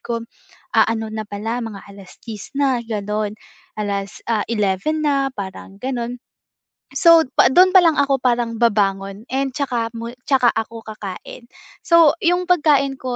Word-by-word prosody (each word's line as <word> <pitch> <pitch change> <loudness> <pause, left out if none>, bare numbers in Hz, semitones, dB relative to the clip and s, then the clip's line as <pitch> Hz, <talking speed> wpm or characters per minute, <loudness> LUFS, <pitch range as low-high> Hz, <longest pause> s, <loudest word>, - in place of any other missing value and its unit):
ko, 230 -1 -4 0.5
ah, - - +4
ano 220 -1 -2
na 215 -1 -5
pala 220 +4 -4
mga 215 -4 -7
10:00 200 +2 -11
na 270 -4 +1
gano'n 210 -2 -3 0.4
alas 200 -2 -4
ah, 215 -2 +1
11:00 225 +8 -1
na 275 -2 +1
parang 195 -1 -8
gano'n. 245 +1 -4 0.8
So, 335 -2 +6 0.2
pa - - +7
du'n 365 +8 +5
pa 375 - +8
lang 335 -3 +4
ako 280 -2 +2
parang 240 -2 0
babangon 200 -3 0
and 270 -1 -1
'tsaka 240 -5 -2
mu 230 +1 -6 0.2
tsaka 260 -4 +4
ako 225 0 -5
kakain. 215 +3 -9 0.3
So, 335 -3 +5
yung 355 +1 +1
pagkain 295 -6 +2
ko 255 -1 -4
235 Hz, 150 wpm, -20 LUFS, 210-275 Hz, 0.8 s, pa